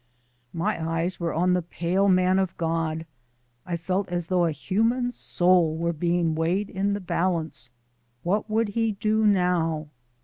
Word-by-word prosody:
My 170 0 -1
eyes 170 +3 -1
were 170 -1 -1
on 180 +2 +2
the 180 - +2
pale 175 +3 0
man 185 0 +4
of 190 -2 -2
God. 165 -1 -1 0.6
I 175 -1 -1
felt 185 +3 -2
as 175 -1 -2
though 180 0 +2
a 165 - +1
human 225 - 0
soul 175 -7 +2
were 170 +1 0
being 170 0 +1
weighed 175 +6 0
in 200 +1 0
the 200 - -2
balance. 165 -9 -1 0.5
What 205 +5 0
would 220 0 +1
he 225 +1 0
do 215 +2 +1
now? 170 -5 +1
180 Hz, 160 wpm, -25 LUFS, 165-200 Hz, 0.6 s, man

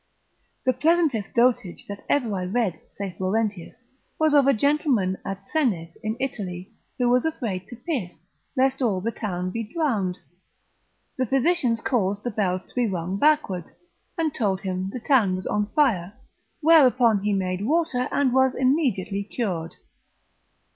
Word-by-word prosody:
The 255 - +3
pleasantest 300 - +1
dotage 235 -6 +1
that 200 0 -7
ever 245 -7 +1
I 185 -2 -2
read, 190 -3 -1
saith 195 -3 -7
Laurentius, 200 -1 -1 0.4
was 315 -1 +2
of 285 -2 +5
a - - +7
gentleman 270 -7 +1
at 195 0 -6
Senes 195 - 0
in 215 +2 -3
Italy, 195 -7 -4 0.3
who 245 - +1
was 250 +1 +3
afraid 220 - -3
to 240 - -9
piss, 225 - -5 0.3
lest 265 +1 +2
all 215 -7 +1
the 225 +5 -2
town 185 -5 -3
should - - -8
be 230 -1 -4
drowned; 220 - 0 1.0
the 260 -1 0
physicians 265 -3 +1
caused 205 -4 0
the 245 - -2
bells 185 -3 0
to - - -19
be 245 -2 +1
rung 185 -1 -3
backward, 290 - +2 0.5
and 320 -3 0
told 195 -5 0
him 185 -1 -3
the 250 - -5
town 230 -7 +3
was 185 - -6
on 210 0 0
fire, 210 - +2 0.5
whereupon 255 -9 +5
he 210 +1 0
made 185 -1 -1
water, 285 -1 +1
and 270 -3 +2
was 265 0 +3
immediately 255 - +1
cured. 185 -7 -3
225 Hz, 155 wpm, -24 LUFS, 190-265 Hz, 1.0 s, a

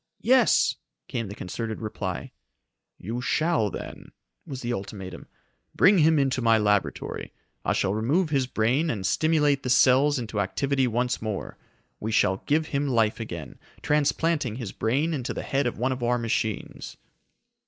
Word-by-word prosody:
"Yes!" 250 +1 +4 0.3
came 115 -3 -3
the 100 - -8
concerted 110 +4 -5
reply. 105 -4 -5 0.7
"You 115 +6 -5
shall, 155 -4 +1
then," - - -9 0.3
was 130 -2 -6
the 120 0 -1
ultimatum. 95 -4 -7 0.5
"Bring 195 0 +5
him 160 0 +5
into 135 -2 +1
my 115 -1 +4
laboratory. 105 -2 -1 0.3
I - - +1
shall 95 - 0
remove 150 - +1
his 135 -3 +1
brain 130 +7 +1
and 100 -9 -3
stimulate 150 +2 +2
the 125 - -4
cells 135 +3 +5
into 115 -4 -3
activity 135 +7 0
once 125 +2 -1
more. 110 -3 -4 0.4
We 110 - -3
shall 95 -3 +3
give 155 +2 +2
him 145 0 -1
life 115 -4 +1
again, 85 -10 -7 0.2
transplanting 150 -3 +1
his 115 -6 -5
brain 140 +9 0
into 135 -3 -3
the - - -4
head 140 -2 0
of 120 - -3
one 125 +4 0
of 130 -1 -4
our 120 +1 +1
machines." 110 -2 -3
125 Hz, 155 wpm, -26 LUFS, 110-145 Hz, 0.7 s, Bring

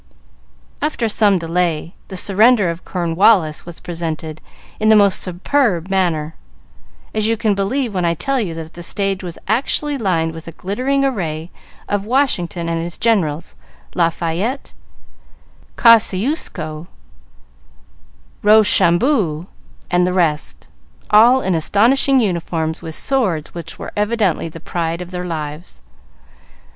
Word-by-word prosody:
After 290 -6 -1
some 205 -2 +3
delay, 170 -1 -1
"The 190 - -6
Surrender 205 0 +3
of 170 +1 -9
Cornwallis" 175 -2 +2
was 175 - -9
presented 160 -2 -5 0.4
in 215 0 +2
the 220 - +7
most 200 -2 +4
superb 185 - 0
manner, 165 -5 0 0.8
as 215 0 0
you 225 0 +1
can 215 -1 +1
believe 220 +5 -1
when 180 -2 -1
I 170 0 +1
tell 270 - -1
you 175 -6 -4
that 160 0 -8
the 175 - -9
stage 195 +2 -1
was 175 -2 -6
actually 275 +6 0
lined 165 -6 0
with 160 0 -10
a 165 - -8
glittering 255 - -1
array 170 -10 -3 0.4
of 205 -1 -1
Washington 190 -10 0
and 165 0 -1
his 170 +1 -3
generals, 175 -8 0 0.4
Lafayette, 170 - -1 1.0
Kosciusko, 200 - +2 1.5
Rochambeau 205 - +3 0.5
and 180 0 +3
the 180 - -1
rest, 165 -5 -1 0.4
all 235 +5 +6
in 190 - 0
astonishing 240 - +3
uniforms, 165 -6 -2
with 160 -1 -6
swords 195 - -1
which 170 -1 -8
were - - -7
evidently 210 -6 0
the 165 - -10
pride 165 0 -3
of 180 0 -8
their 180 0 -4
lives. 155 - -6
180 Hz, 130 wpm, -18 LUFS, 165-220 Hz, 1.5 s, the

